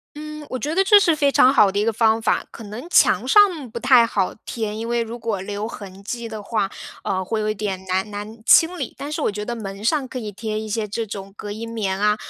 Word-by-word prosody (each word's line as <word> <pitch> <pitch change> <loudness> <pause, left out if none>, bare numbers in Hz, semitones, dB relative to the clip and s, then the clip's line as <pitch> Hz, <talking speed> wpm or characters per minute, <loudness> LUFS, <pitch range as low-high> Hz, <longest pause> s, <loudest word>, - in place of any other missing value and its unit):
嗯， 305 0 -8
我 255 - -4
觉 300 +5 -3
得 385 - +4
这 410 +2 +7
是 340 -5 +3
非 285 -2 +2
常 260 -1 +5
好 210 -7 +5
的 200 - -2
一 210 - +2
个 230 - +1
方 225 0 +3
法。 - - +1
可 230 - -10
能 220 +11 -8
墙 - - +4
上 365 - +4
不 - - -5
太 250 -3 +5
好 195 -4 -1
贴， 220 -3 -4
因 225 +2 -5
为 235 0 +1
如 230 +1 -6
果 225 -4 -2
留 205 +2 -4
痕 195 -3 -10
迹 235 +2 -5
的 215 -2 -7
话， 200 -3 -1 0.3
呃， 190 -1 -1
会 220 +3 -2
有 215 - 0
一 215 - -1
点 195 -2 -4
难 190 +3 -1
难 210 +2 -8
清 335 +6 +5
理， - - -4
但 290 +2 -6
是 315 - -2
我 - - +2
觉 210 +1 -5
得 240 +2 -3
门 200 -2 -7
上 270 0 +1
可 255 - -5
以 210 -3 -6
贴 215 +1 -4
一 215 0 -5
些 215 -1 -2
这 225 +2 -3
种 195 -1 -7
隔 205 -1 -6
音 230 +2 -6
棉 195 -4 -2
啊， 210 0 +3
220 Hz, 285 characters per minute, -22 LUFS, 205-255 Hz, 0.3 s, 这